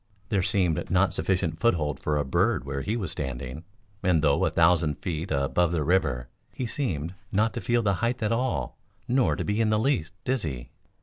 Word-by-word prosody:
There 100 -4 +2
seemed 90 -4 0
not 95 +1 +3
sufficient 90 -4 0
foothold 80 -10 +1
for 75 -1 0
a 75 - 0
bird 65 -1 +1
where 70 0 -3
he 110 - -1
was 95 -8 -3
standing, 65 +2 -5 0.4
and 90 -5 +2
though 70 -2 +3
a - - +2
thousand 80 -3 +3
feet 85 -1 -4
above 80 +4 +1
the 80 -3 0
river, 70 -8 +1 0.2
he 130 - -4
seemed 90 - -2 0.2
not 105 +3 +2
to - - -4
feel 120 -1 +1
the 100 -2 +2
height 120 0 0
at 105 - +1
all 125 +2 -1 0.3
nor 130 0 +2
to - - -3
be 105 +2 0
in 110 - +2
the 110 - +3
least 110 - 0
dizzy. 80 - -2
90 Hz, 195 wpm, -27 LUFS, 75-110 Hz, 0.4 s, not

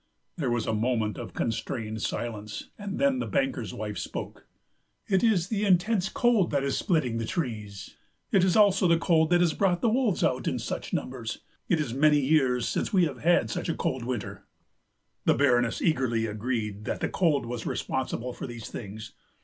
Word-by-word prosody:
There 145 -8 -1
was 120 -2 0
a - - -1
moment 110 -2 0
of - - -8
constrained 110 -1 -3
silence, 110 -2 -4
and 205 -1 -5
then 275 -1 +2
the - - -2
banker's 270 -1 -1
wife - - -5
spoke. - - -6 0.6
"It 190 -2 +2
is 195 -6 +3
the 210 -2 -1
intense 195 +1 +2
cold 235 -7 +2
that 140 -2 0
is 140 - 0
splitting 130 - 0
the 115 - -2
trees. 105 - -5 0.3
It 190 - +4
is 185 -1 +3
also 200 -3 +5
the 170 0 +4
cold 160 -2 +3
that 175 0 +4
has 170 -3 +3
brought 180 -1 +1
the 230 - +3
wolves 235 -5 +1
out - - +1
in - - 0
such - - -4
numbers. - - -4 0.3
It 175 -5 +3
is 135 -6 -2
many 150 +2 +4
years 130 -4 +2
since - - -1
we 185 -4 +4
have 150 - -5
had 170 +1 +3
such 175 -1 -3
a 165 - 0
cold 130 -2 -1
winter." 105 -6 -5 0.8
The - - +4
Baroness 120 -4 +2
eagerly 125 -7 +1
agreed 105 -1 -3
that - - -2
the - - 0
cold 160 -8 +1
was 120 -1 -5
responsible 125 -1 -2
for - - -6
these 120 -2 -8
things. 110 +1 -8
140 Hz, 190 wpm, -27 LUFS, 115-180 Hz, 0.8 s, also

